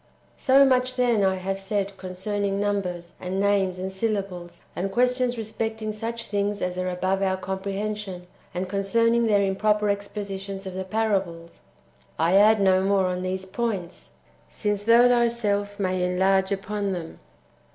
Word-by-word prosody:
So 270 +1 +5
much, 255 -1 +2
then, 240 -5 +2
I 190 -1 +3
have 190 +1 -3
said 200 0 -2
concerning 195 +2 -3
numbers, 185 -4 -2
and 185 +1 -3
names, 195 -2 +2
and 190 +1 -4
syllables, 190 -4 -3 0.2
and 195 +2 -2
questions 250 +2 +2
respecting 220 0 -3
such 230 +2 -4
things 205 0 -1
as 180 0 -2
are 185 0 -1
above 185 +2 -1
our 190 -1 +1
com 190 0 -4
prehension, 200 -1 -4 0.3
and 180 +1 -3
concerning 230 +4 +2
their 205 -2 +3
improper 210 +2 +1
expositions 200 -1 -5
of 190 - -6
the 190 0 -4
parables: 190 -5 -2 0.6
[I 165 +3 +2
add 215 +2 +6
no 190 -1 +4
more 195 0 +2
on 180 0 -1
these 185 +1 -3
points,] 190 -4 -4 0.4
since 205 -2 -2
thou 230 +3 +6
thyself 225 -4 +1
mayest 185 -2 0
enlarge 190 +1 +2
upon 200 0 -2
them. 170 -3 -7
200 Hz, 150 wpm, -25 LUFS, 190-215 Hz, 0.6 s, add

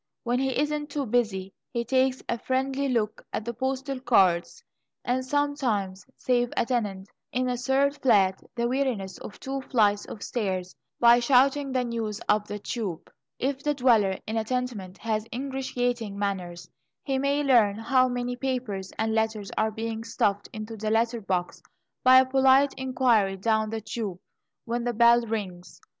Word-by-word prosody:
When 245 +1 0
he 265 -1 0
isn't 295 0 -1
too 285 -1 -2
busy, 210 -5 -1 0.2
he 235 -1 -3
takes 260 +1 +1
a 235 - -2
friendly 265 +2 -1
look 220 -4 -1
at 215 - -3
the 235 - -3
postal 265 +2 -3
cards, 195 - +2 0.4
and 255 +1 0
sometimes 255 -9 -1
saves 245 -1 +1
a - - +2
tenant 205 -6 -2 0.2
in 255 +1 0
a 250 - 0
third 270 +3 +1
flat 195 -7 +3
the 235 0 0
weariness 245 -7 -2
of - - -10
two 270 0 -4
flights 210 -6 +2
of 210 - -8
stairs 185 -6 -3 0.2
by 240 0 +7
shouting 270 +3 +3
the 255 -1 +1
news 225 -3 -3
up 210 0 +2
the 205 - -4
tube! 205 -5 -5 0.3
If 270 +1 -2
the 295 0 0
dweller 225 -7 +3
in 220 +1 -3
a 220 - +1
tenement 220 -6 -3
has 220 -1 -2
ingratiating 245 -5 -2
manners, 185 -4 -3 0.4
he 270 -2 -1
may 280 +2 +1
learn 235 -7 +4
how 255 +3 +3
many 245 0 -2
papers, 245 -7 -3
and 220 0 0
letters 220 -2 -1
are 220 - +1
being 225 +1 -4
stuffed 205 -3 -1
into 215 +1 -7
the 215 +1 -2
letter 230 +1 +1
box, 180 -3 -2 0.4
by 255 0 +8
a - - 0
polite 265 +1 +4
inquiry 245 -7 +1
down 220 +2 +1
the 220 0 -4
tube 210 -4 -4 0.5
when 235 +1 -2
the 240 0 -1
bell 235 +1 +6
rings. 185 -5 -5
235 Hz, 165 wpm, -26 LUFS, 210-260 Hz, 0.5 s, by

